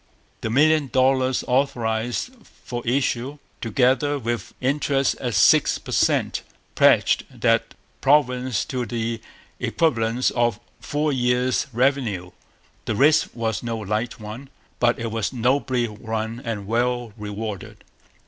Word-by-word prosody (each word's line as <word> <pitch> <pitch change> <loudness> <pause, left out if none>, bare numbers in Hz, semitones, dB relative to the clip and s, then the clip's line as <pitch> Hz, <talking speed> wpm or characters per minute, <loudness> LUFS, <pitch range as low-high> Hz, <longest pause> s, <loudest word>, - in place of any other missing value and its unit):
The - - -2
million 150 +4 +3
dollars 130 0 +2
authorized 125 - 0
for 120 -1 -8
issue, 130 +1 0 0.2
together 130 +5 +2
with 120 -4 -3
interest 140 0 +1
at 120 -5 -3
six 90 - +5
per - - -10
cent, - - +1 0.3
pledged - - +4
that - - 0 0.3
province 130 -3 +2
to 125 -3 -3
the 115 0 -3 0.4
equivalent 120 -6 +1
of 120 -3 +1 0.2
four 150 0 -1
years' 125 0 +1
revenue. 120 -8 0 0.5
The 110 - -1
risk 145 +6 +4
was 115 -3 -2
no 115 -1 -3
light 110 +5 -3
one. 110 +6 -8 0.3
But 120 0 +3
it 115 -1 -4
was 110 -1 -1
nobly 125 0 +1
run 110 +2 -4
and 110 -4 -4
well 120 +1 -1
rewarded. 105 -1 -6
120 Hz, 120 wpm, -23 LUFS, 110-130 Hz, 0.5 s, six